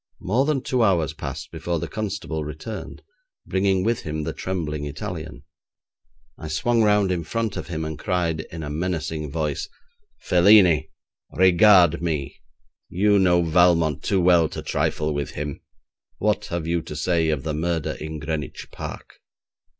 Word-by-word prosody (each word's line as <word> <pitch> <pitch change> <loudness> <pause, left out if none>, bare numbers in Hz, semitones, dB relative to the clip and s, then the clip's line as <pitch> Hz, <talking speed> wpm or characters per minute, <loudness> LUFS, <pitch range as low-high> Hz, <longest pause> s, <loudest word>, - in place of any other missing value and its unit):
More 120 +9 +1
than 150 -3 0
two 130 -2 0
hours 90 -9 +2
passed - - -6
before 85 -1 -3
the - - -4
constable 100 -7 -4
returned, 80 +8 -7 0.4
bringing 95 0 +1
with 115 +2 0
him 80 0 -4
the - - -3
trembling 80 -6 -3
Italian. 80 -3 -6 1.0
I 80 - -6
swung 115 +10 +1
round 105 -3 +3
in 85 -2 -1
front 115 +5 -2
of - - -5
him, 80 -2 -4
and 80 -1 -5
cried, 85 -3 -1
in 80 -1 -6
a 75 - -5
menacing 80 -2 -3
voice: 75 -2 -2 0.5
'Felini! 90 -4 +5 0.4
Regard 90 -2 +5
me! 75 -5 -3 0.5
You 100 +2 +3
know 90 -2 +4
Valmont 85 -2 +3
too 100 - +1
well 85 -3 +4
to - - -6
trifle 75 0 -1
with 70 -1 -3
him! 75 -1 -5 0.6
What - - 0
have 85 -2 -4
you 85 0 0
to - - -8
say 85 -3 +1
of 75 -4 -1
the 80 -1 -2
murder 80 0 -1
in 80 0 -5
Greenwich 75 -2 -5
Park?' - - -8
85 Hz, 155 wpm, -23 LUFS, 80-95 Hz, 1.0 s, Felini